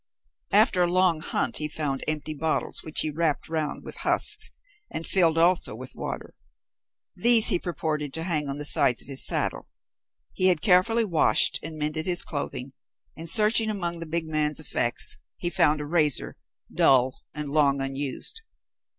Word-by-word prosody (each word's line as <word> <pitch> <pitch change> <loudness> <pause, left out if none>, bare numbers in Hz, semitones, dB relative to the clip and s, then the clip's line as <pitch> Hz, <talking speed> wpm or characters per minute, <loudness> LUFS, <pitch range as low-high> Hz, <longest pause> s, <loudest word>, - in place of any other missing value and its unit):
After 180 - +3
a 175 0 +1
long 180 -3 +2
hunt 155 - -2
he 150 - -3
found 145 -3 -3
empty 155 0 -3
bottles 155 +1 -3
which 155 - -2
he 155 - -3
wrapped 155 -1 -2
round 155 -2 -4
with - - -9
husks 425 +1 +3 0.4
and 165 - -6
filled 165 -4 +2
also 170 +2 +1
with - - -10
water. - - -7 0.8
These 235 -2 +5
he - - +1
purposed 155 -5 -4
to 160 - -2
hang 155 -5 -3
at 140 - -5
the 150 - -4
sides 125 -4 +4
of - - -20
his 135 -1 +2
saddle. - - -1 0.6
He 185 - +1
had 180 -4 +3
carefully 220 +5 +2
washed 170 -6 +3
and 155 +1 -8
mended 155 +2 -3
his 175 -1 +1
clothing, 140 -3 -5 0.4
and 165 +1 -2
searching 220 +3 +4
among 175 -5 -4
the 165 - -7
big 165 0 -3
man's 155 -1 -2
effects, 120 -5 +1 0.2
he 175 - -4
found 150 -2 +2
a 150 - -5
razor, 150 -3 0 0.4
dull 130 -1 +2
and 150 -2 -6
long 140 -2 +2
unused. 135 - -4
155 Hz, 170 wpm, -25 LUFS, 150-175 Hz, 0.8 s, These